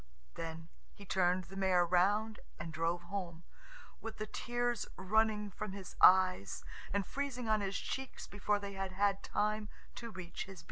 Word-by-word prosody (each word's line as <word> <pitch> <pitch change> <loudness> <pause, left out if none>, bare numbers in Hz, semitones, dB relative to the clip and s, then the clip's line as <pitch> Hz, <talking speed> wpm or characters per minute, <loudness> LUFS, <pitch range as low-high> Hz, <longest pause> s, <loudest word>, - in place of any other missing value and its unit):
Then 165 0 -6 0.3
he 200 - -11
turned 185 -1 +2
the 190 +2 -11
mare 190 -2 +4
round 205 +5 +3 0.2
and 165 0 -6
drove 165 +2 0
home, 175 -3 -5 0.6
with 225 -1 -6
the 215 - -2
tears 240 0 -1
running 210 +1 +2
from 190 +1 -5
his 195 -2 -8
eyes 185 - +6 0.3
and 200 0 +1
freezing 265 -4 -3
on 215 -1 +3
his 195 0 -1
cheeks 265 -1 -4
before 205 +1 0
they 200 -1 -5
had 195 -1 -3
had 200 +1 +2
time 210 0 0 0.3
to 235 - -5
reach 185 -4 -6
his 195 -1 -10
beard. - - -9
195 Hz, 170 wpm, -35 LUFS, 180-215 Hz, 0.6 s, eyes